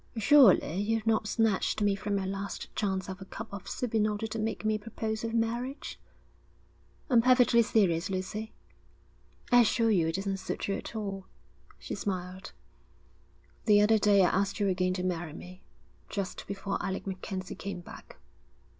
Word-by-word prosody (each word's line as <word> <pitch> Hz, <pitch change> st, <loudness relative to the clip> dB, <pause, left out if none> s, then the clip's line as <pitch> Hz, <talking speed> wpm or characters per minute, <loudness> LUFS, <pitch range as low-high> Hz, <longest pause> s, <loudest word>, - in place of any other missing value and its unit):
'Surely 220 Hz, -, +6 dB
you've 220 Hz, +2 st, 0 dB
not 220 Hz, -1 st, +2 dB
snatched 220 Hz, -2 st, +1 dB
me 205 Hz, -1 st, +2 dB
from 200 Hz, +1 st, -2 dB
my 195 Hz, -1 st, -1 dB
last 195 Hz, +1 st, -5 dB
chance 190 Hz, -3 st, -1 dB
of 190 Hz, 0 st, -7 dB
a -, -, -7 dB
cup 220 Hz, +3 st, -7 dB
of 200 Hz, -2 st, -7 dB
soup 245 Hz, -3 st, -3 dB
in 215 Hz, -1 st, +3 dB
order 210 Hz, +1 st, -2 dB
to 225 Hz, 0 st, -4 dB
make 220 Hz, 0 st, -3 dB
me 215 Hz, -, +2 dB
a 215 Hz, -, -1 dB
proposal 220 Hz, +1 st, -4 dB
of 225 Hz, -, -4 dB
marriage?' 240 Hz, +4 st, -2 dB, 1.1 s
'I'm 235 Hz, -2 st, +6 dB
perfectly 250 Hz, -1 st, +5 dB
serious, 195 Hz, -6 st, +2 dB
Lucy.' 195 Hz, +4 st, -4 dB, 1.0 s
'I 245 Hz, 0 st, +8 dB
assure 230 Hz, 0 st, +2 dB
you 175 Hz, -6 st, +3 dB
it 165 Hz, -, -1 dB
doesn't 195 Hz, 0 st, -2 dB
suit 190 Hz, -, -4 dB
you 200 Hz, -, 0 dB
at 225 Hz, -, -6 dB
all,' 195 Hz, -3 st, -4 dB, 0.5 s
she -, -, -7 dB
smiled. 185 Hz, -1 st, -4 dB, 1.1 s
'The 210 Hz, -2 st, +6 dB
other 215 Hz, +1 st, +4 dB
day 200 Hz, -2 st, +5 dB
I -, -, +3 dB
asked 195 Hz, +2 st, 0 dB
you 200 Hz, -1 st, +2 dB
again 185 Hz, 0 st, 0 dB
to 180 Hz, -, -3 dB
marry 175 Hz, -3 st, -2 dB
me, 180 Hz, +3 st, -11 dB, 0.5 s
just 195 Hz, -2 st, -4 dB
before 195 Hz, 0 st, -3 dB
Alec 190 Hz, 0 st, -3 dB
MacKenzie 190 Hz, 0 st, -5 dB
came 195 Hz, -2 st, -6 dB
back.' -, -, -13 dB
200 Hz, 170 wpm, -29 LUFS, 190-220 Hz, 1.1 s, I